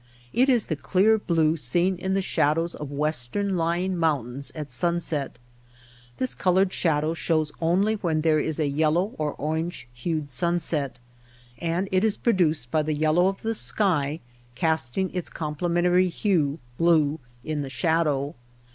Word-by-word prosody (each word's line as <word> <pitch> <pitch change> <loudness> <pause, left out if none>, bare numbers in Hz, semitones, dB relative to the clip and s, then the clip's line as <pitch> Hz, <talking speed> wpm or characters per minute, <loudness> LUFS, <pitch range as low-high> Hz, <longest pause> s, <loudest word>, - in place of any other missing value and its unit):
It 260 +3 +3
is 240 -5 +3
the 155 - -2
clear 200 +8 +3
blue 165 -4 +2
seen 175 +8 +1
in 190 +2 -1
the 195 - +1
shadows 165 +1 +1
of 150 -2 -7
western 150 +6 -1
lying 175 +2 0
mountains 140 -5 -1
at 150 -3 -6
sunset. 160 -1 -1 0.8
This 255 - 0
colored 185 +1 +2
shadow 155 -1 +1
shows 155 0 0
only 185 +6 +2
when 170 -7 -1
there 155 -1 +3
is 155 0 -2
a 155 - +2
yellow 160 +7 +1
or 150 -1 -1
orange 160 -1 -3
hued 155 +4 -3
sunset, 145 -2 0 0.6
and 170 +5 -1
it 185 +1 +2
is 220 -1 +1
produced 160 - +1
by 155 - +2
the 155 0 -1
yellow 155 +4 +3
of 195 0 -3
the 225 0 0
sky 150 - +1 0.3
casting 160 +4 0
its 180 -2 -3
complementary 175 +4 +1
hue 165 -6 0 0.2
(blue) 160 -3 +3 0.2
in 155 0 -2
the 140 - -5
shadow. 145 +1 0
160 Hz, 150 wpm, -25 LUFS, 150-180 Hz, 0.8 s, It